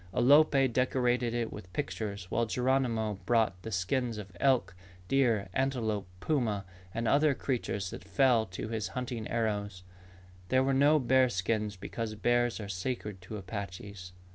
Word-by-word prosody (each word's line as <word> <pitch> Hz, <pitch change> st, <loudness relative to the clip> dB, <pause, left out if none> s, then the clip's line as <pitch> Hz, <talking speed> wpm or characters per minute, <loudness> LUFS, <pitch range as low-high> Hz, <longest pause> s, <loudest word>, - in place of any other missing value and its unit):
Alope 140 Hz, +1 st, +5 dB
decorated 125 Hz, -1 st, +1 dB
it 120 Hz, -1 st, -2 dB
with 95 Hz, -4 st, -10 dB
pictures 105 Hz, -9 st, -3 dB
while 115 Hz, -1 st, +1 dB
Geronimo 115 Hz, -3 st, 0 dB
brought 110 Hz, -5 st, +2 dB
the 110 Hz, -, -6 dB
skins 110 Hz, +5 st, -1 dB
of 100 Hz, -3 st, -9 dB
elk, 130 Hz, -8 st, +2 dB, 0.3 s
deer, 120 Hz, -6 st, +2 dB
antelope, 115 Hz, -7 st, -1 dB
puma, 110 Hz, -8 st, 0 dB, 0.3 s
and 115 Hz, +3 st, -2 dB
other 145 Hz, +1 st, +4 dB
creatures 105 Hz, -8 st, -2 dB
that -, -, -8 dB
fell 115 Hz, +3 st, +3 dB
to 95 Hz, +3 st, -6 dB
his 110 Hz, -4 st, -2 dB
hunting 120 Hz, -3 st, -3 dB
arrows. 105 Hz, -4 st, -2 dB, 0.7 s
There 130 Hz, 0 st, +4 dB
were 135 Hz, 0 st, +1 dB
no 145 Hz, +3 st, +5 dB
bear 130 Hz, -1 st, +4 dB
skins 105 Hz, 0 st, -1 dB
because 110 Hz, +3 st, -5 dB
bears 120 Hz, +2 st, +1 dB
are 105 Hz, -, -5 dB
sacred 100 Hz, 0 st, -4 dB
to 105 Hz, +4 st, -7 dB
Apaches. 100 Hz, -1 st, -7 dB
115 Hz, 145 wpm, -30 LUFS, 100-130 Hz, 0.7 s, Alope